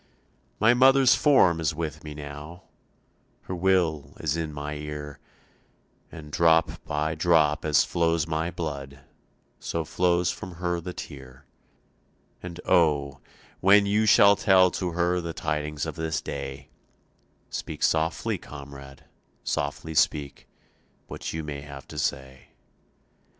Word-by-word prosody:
"My 110 +3 +5
mother's 130 +1 +6
form 95 - +4
is 80 -1 -1
with 80 -3 -5
me 75 -1 -8
now, 75 +4 -9 0.8
Her - - -7
will 90 -5 0
is 80 -1 -1
in 80 -2 -3
my 75 0 -5
ear, 75 -1 -7 0.9
And 75 -3 -10
drop 80 +1 +2
by 75 +1 -1
drop 80 -2 +2
as 75 -2 +4
flows 85 -2 0
my 80 +1 -2
blood 70 -5 -6 0.6
So 85 -1 -3
flows 90 +2 +1
from 95 - -8
her 85 0 -2
the 90 - -6
tear. 65 -2 -10 1.0
And 90 -1 -8
oh, 70 -4 +2 0.4
when 100 +2 +5
you 105 +2 +2
shall 100 -1 +7
tell 95 -2 +4
to 90 -3 -3
her 90 +1 +1
The 85 -1 -5
tidings 75 -1 -3
of 80 - -4
this 80 -1 -2
day, 70 -1 -7 0.8
Speak - - -5
softly, 80 +1 0
comrade, 70 -1 -11 0.4
softly 80 +2 -3
speak 75 -2 0 0.6
What - - -6
you 80 0 -4
may 75 -2 -6
have 70 -1 -11
to 75 - -6
say. 65 -2 -3
80 Hz, 130 wpm, -26 LUFS, 75-85 Hz, 1.0 s, shall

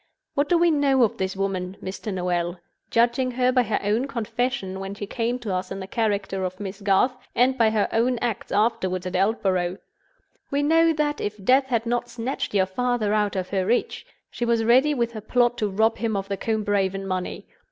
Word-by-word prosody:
What 285 +1 0
do 350 - +4
we 340 0 +4
know 280 -4 +3
of 225 - +1
this 190 0 -1
woman, 190 -1 -2
Mr. 195 +3 -5
Noel—judging 180 +8 -1
her 250 +1 +2
by 255 -1 +4
her 220 -3 -1
own 215 +6 +1
confession 230 -5 -2
when 195 +1 -5
she 205 - -5
came 230 +4 -2
to 225 -6 -4
us 185 0 -2
in 195 - -5
the 190 - -5
character 200 -3 -1
of 185 0 -4
Miss 200 0 -6
Garth, 205 +6 +3 0.2
and 255 +2 +3
by 230 -4 +4
her 215 -2 +1
own 240 +2 +2
acts 230 -2 -3
afterward 190 -4 0
at 185 - -4
Aldborough? 190 -2 +1 0.7
We 285 +1 0
know 325 +2 +4
that, 295 -1 -1
if 205 -1 -5
death 265 +3 +4
had 235 -3 0
not 240 +1 -1
snatched 235 -1 -4
your 190 -1 +4
father 225 +1 0
out 210 -1 +1
of 185 -1 -2
her 190 -2 0
reach, 240 - -1 0.2
she - - -4
was 235 -1 +2
ready 260 +6 +4
with 235 -2 0
her 220 -2 -7
plot 240 +2 +2
to 210 - 0
rob 220 +3 +1
him 220 -2 0
of 195 0 -4
the 200 - 0
Combe 220 +1 -1
Raven 195 -1 0
money. 185 -1 -4
220 Hz, 205 wpm, -24 LUFS, 195-245 Hz, 0.7 s, do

